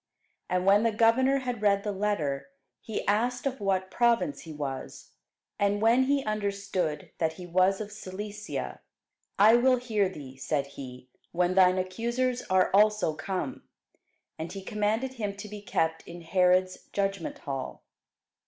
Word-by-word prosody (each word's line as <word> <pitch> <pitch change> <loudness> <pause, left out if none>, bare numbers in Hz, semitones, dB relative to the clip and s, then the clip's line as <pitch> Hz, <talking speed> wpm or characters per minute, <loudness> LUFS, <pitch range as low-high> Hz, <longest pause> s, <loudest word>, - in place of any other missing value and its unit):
And 180 0 0
when 200 +2 +6
the 230 0 +2
governor 255 +5 +3
had 245 -4 -4
read 200 -1 +3
the 210 - -1
letter, 160 -10 -1 0.3
he 220 - -5
asked 240 +6 +1
of 270 -1 -2
what 190 -1 0
province 240 +4 +2
he 160 - -9
was. 140 -3 -6 0.5
And 205 0 +2
when 235 +4 +4
he 280 0 +1
understood 200 -6 -2
that 160 -1 +1
he 180 +2 -9
was 185 +2 +2
of 210 -1 -6
Cilicia; 210 +1 -6 0.6
I 220 +4 +7
will 255 +1 +4
hear 220 -6 0
thee, 135 -7 -10
said 140 +1 -1
he, 130 -2 -10 0.3
when 175 +1 +2
thine 185 -1 +5
accusers 235 +7 -1
are 185 0 +3
also 210 -4 +4
come. 190 - -4 0.8
And 160 +1 -4
he 195 -1 -7
commanded 220 +5 -1
him 210 -5 -4
to 205 +1 -8
be 210 0 -8
kept 160 -5 -1
in 175 0 -9
Herod's 185 +2 +2
judgment 195 -3 -2
hall. 135 -3 -6
200 Hz, 155 wpm, -28 LUFS, 180-225 Hz, 0.8 s, I